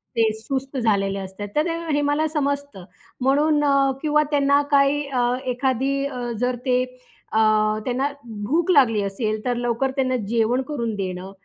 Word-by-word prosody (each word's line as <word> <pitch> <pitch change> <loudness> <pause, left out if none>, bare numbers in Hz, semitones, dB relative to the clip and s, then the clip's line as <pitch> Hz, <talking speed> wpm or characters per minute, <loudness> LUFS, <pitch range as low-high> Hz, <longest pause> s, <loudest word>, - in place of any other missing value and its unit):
ते 225 -1 +3
सुस्त 265 +3 -4
झालेले 200 -4 +1
असतात, 190 +2 -7
तर 305 +2 +2
ते 335 -1 -1 0.2
हे 290 - +2
मला 310 +2 +1
समजतं 285 - -3 0.4
म्हणून 295 +3 +3
अ, 275 -1 +3
किंवा 300 -1 +3
त्यांना 280 0 +3
काही 280 +1 +3
अ, 255 -3 -1 0.2
एखादी 260 +1 0
अ, 250 -3 -4
जर 250 0 0
ते 250 0 +2 0.5
अ, - - +1 0.5
त्यांना 260 +3 0 0.4
भूक 335 - 0
लागली 235 - +4
असेल, 215 +2 -2
तर 245 -1 0
लवकर 240 +2 0
त्यांना 255 -1 +1
जेवण 235 +3 +1
करून 235 -7 -2
देणं. 185 -1 -5
260 Hz, 155 wpm, -22 LUFS, 230-285 Hz, 0.5 s, लागली